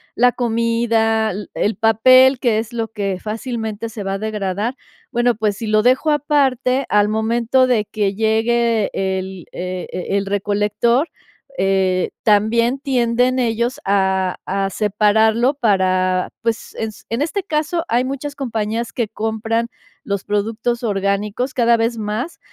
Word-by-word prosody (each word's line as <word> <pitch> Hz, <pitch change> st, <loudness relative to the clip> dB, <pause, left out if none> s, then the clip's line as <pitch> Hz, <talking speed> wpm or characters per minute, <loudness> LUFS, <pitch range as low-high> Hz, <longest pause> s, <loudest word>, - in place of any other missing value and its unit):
la 245 Hz, +1 st, +4 dB
comida, 230 Hz, -2 st, +1 dB
l 205 Hz, +1 st, -5 dB
el 210 Hz, -, 0 dB
papel, 255 Hz, +5 st, +5 dB
que 235 Hz, -4 st, +2 dB
es 225 Hz, +2 st, -4 dB
lo 230 Hz, -1 st, -2 dB
que 200 Hz, -4 st, -3 dB
fácilmente 220 Hz, 0 st, -4 dB
se 220 Hz, -1 st, -7 dB
va 195 Hz, -, -2 dB
a -, -, -1 dB
degradar. 210 Hz, +2 st, -2 dB, 0.4 s
Bueno, 240 Hz, -1 st, +2 dB
pues, 210 Hz, -2 st, 0 dB
si 225 Hz, -, -5 dB
lo 215 Hz, 0 st, +3 dB
dejo 255 Hz, +5 st, +3 dB
aparte, 275 Hz, -3 st, +1 dB
al 210 Hz, 0 st, +3 dB
momento 235 Hz, +4 st, +2 dB
de 230 Hz, -4 st, +1 dB
que 200 Hz, -2 st, -1 dB
llegue 225 Hz, 0 st, +1 dB
el 190 Hz, -2 st, -3 dB
e 180 Hz, 0 st, -5 dB, 0.3 s
el 200 Hz, -, -1 dB
recolector, 210 Hz, -, +1 dB, 0.5 s
eh, 190 Hz, -1 st, +1 dB
también 230 Hz, +4 st, +2 dB
tienden 250 Hz, -1 st, +1 dB
ellos 235 Hz, 0 st, -1 dB
a 190 Hz, -2 st, +1 dB
a 195 Hz, 0 st, -1 dB
separarlo 220 Hz, +5 st, +2 dB
para, 185 Hz, -6 st, +1 dB
pues, 230 Hz, -1 st, -3 dB
ens 220 Hz, -1 st, -6 dB
en 230 Hz, +5 st, -2 dB
este 375 Hz, +5 st, -1 dB
caso 315 Hz, 0 st, -1 dB
hay 245 Hz, +2 st, +2 dB
muchas 275 Hz, +2 st, -4 dB
compañías 230 Hz, -3 st, -3 dB
que 230 Hz, -4 st, -2 dB
compran 225 Hz, +1 st, -2 dB, 0.4 s
los 200 Hz, -1 st, -2 dB
productos 225 Hz, +4 st, -2 dB
orgánicos 205 Hz, +4 st, -1 dB
cada 235 Hz, -1 st, +3 dB
vez 230 Hz, +1 st, 0 dB
más, 220 Hz, +9 st, -4 dB
225 Hz, 140 wpm, -19 LUFS, 205-240 Hz, 0.5 s, papel